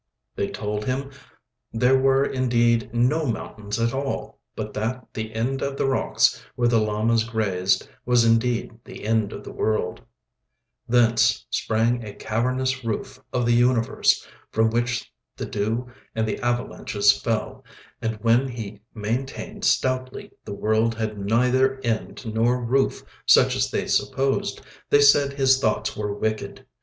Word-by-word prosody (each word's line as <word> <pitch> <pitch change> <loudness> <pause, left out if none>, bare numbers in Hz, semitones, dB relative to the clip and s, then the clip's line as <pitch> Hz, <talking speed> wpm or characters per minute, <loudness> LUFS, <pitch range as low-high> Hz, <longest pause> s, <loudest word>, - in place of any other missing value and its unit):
They - - -1
told 105 0 -4
him 135 +2 -2 0.6
there 125 +3 +3
were 135 +1 +3
indeed 120 -3 +1
no 130 +7 +1
mountains 110 -2 -4
at 115 0 +1
all, 135 0 -4 0.2
but - - -5
that 115 +3 -3
the 110 0 -4
end 130 +4 -1
of 140 0 -2
the - - 0
rocks 135 -1 +2
where 120 - +2
the 115 -1 +4
llamas 110 +2 +1
grazed 100 -5 0 0.2
was 120 -1 +3
indeed 115 +1 +2
the - - -11
end 110 -2 +1
of - - -8
the - - -8
world; 110 0 -1 0.9
thence 120 -1 +3
sprang 115 +2 +1
a 105 -2 -8
cavernous 130 +3 -1
roof 115 -2 -4
of 125 -1 0
the 120 - +3
universe, 120 -1 +2 0.2
from 110 0 +2
which 120 0 -1 0.2
the - - -4
dew 110 +4 -2 0.3
and 110 0 0
the 110 - -2
avalanches 120 -4 +1
fell; 125 +3 -3 0.4
and 115 -1 -1
when 120 +3 +4
he 110 -5 -7
maintained 115 +6 -4
stoutly 130 0 0
the - - -8
world 110 +2 +1
had 110 -2 -3
neither 125 +6 +2
end 115 +1 -3
nor 115 +3 +1
roof 130 +3 0 0.2
such - - +6
as - - +1
they - - -1
supposed, 135 0 0 0.3
they 145 - +5
said 140 0 +5
his 135 -1 +3
thoughts 110 -5 0
were 105 -1 -3
wicked. 110 +1 -3
115 Hz, 150 wpm, -24 LUFS, 110-130 Hz, 0.9 s, such